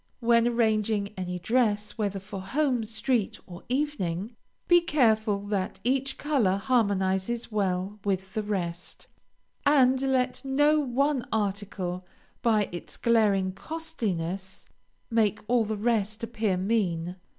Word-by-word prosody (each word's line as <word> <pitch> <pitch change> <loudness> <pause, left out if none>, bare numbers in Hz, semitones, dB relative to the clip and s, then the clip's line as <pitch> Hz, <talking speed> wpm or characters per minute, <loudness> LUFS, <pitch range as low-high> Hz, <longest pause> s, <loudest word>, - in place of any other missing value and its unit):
When 235 -1 +4
arranging 220 -3 +1
any 180 -1 -4
dress, 210 +1 +1
whether 200 -3 -2
for 195 0 -7
home, 255 +3 0
street, 225 0 -1
or 175 -1 -10
evening, 230 - -2 0.3
be 350 0 +6
careful 220 -10 +2
that 195 -3 -2
each 265 +2 0
color 250 -11 +1
harmonizes 200 -1 0
well 195 0 -1
with 190 -1 -2
the 215 - -1
rest, 180 -4 -4 0.6
and 265 -3 +4
let 260 -1 0
no 290 +3 +3
one 275 0 0
article, 200 -4 -2 0.4
by 215 -3 +3
its 175 - -7
glaring 210 -5 +3
costliness, 195 - -4 0.5
make 215 -2 +2
all 235 -2 +3
the 215 0 -3
rest 220 0 0
appear 220 -4 -1
mean. 180 -4 -1
215 Hz, 120 wpm, -27 LUFS, 190-245 Hz, 0.6 s, be